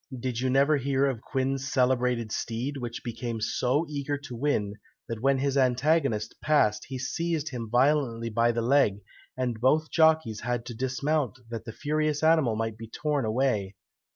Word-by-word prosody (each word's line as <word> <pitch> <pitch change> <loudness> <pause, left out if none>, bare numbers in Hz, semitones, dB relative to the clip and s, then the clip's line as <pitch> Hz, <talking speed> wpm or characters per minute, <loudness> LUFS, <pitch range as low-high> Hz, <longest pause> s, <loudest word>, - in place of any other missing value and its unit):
Did 120 -1 -3
you 130 +1 0
never 140 +3 +4
hear 135 0 +1
of 130 -5 -1
Quin's 135 +1 -2
celebrated 125 -3 +1
steed, 120 +7 -3
which 120 -2 -6
became 115 -1 -4
so 130 +7 0
eager 145 -1 -3
to 140 -3 -9
win, 115 -6 0 0.3
that 115 -2 -5
when 135 +1 +3
his 140 +1 +1
antagonist 130 -3 +1
passed 110 -9 +2
he 130 - -5
seized 160 +3 -2
him 120 -5 -6
violently 120 -3 +2
by 115 +2 +3
the 115 0 -2
leg, 120 -6 +3 0.4
and 125 -3 -2
both 155 +5 +2
jockeys 160 -9 +3
had 120 0 -2
to 120 - -6
dismount 130 +2 -1
that 115 -1 -5
the 115 - -6
furious 150 +3 -1
animal 160 -8 +4
might 110 0 -3
be 115 -1 -8
torn 145 +1 -1
away. 110 -4 0
130 Hz, 170 wpm, -27 LUFS, 115-145 Hz, 0.4 s, never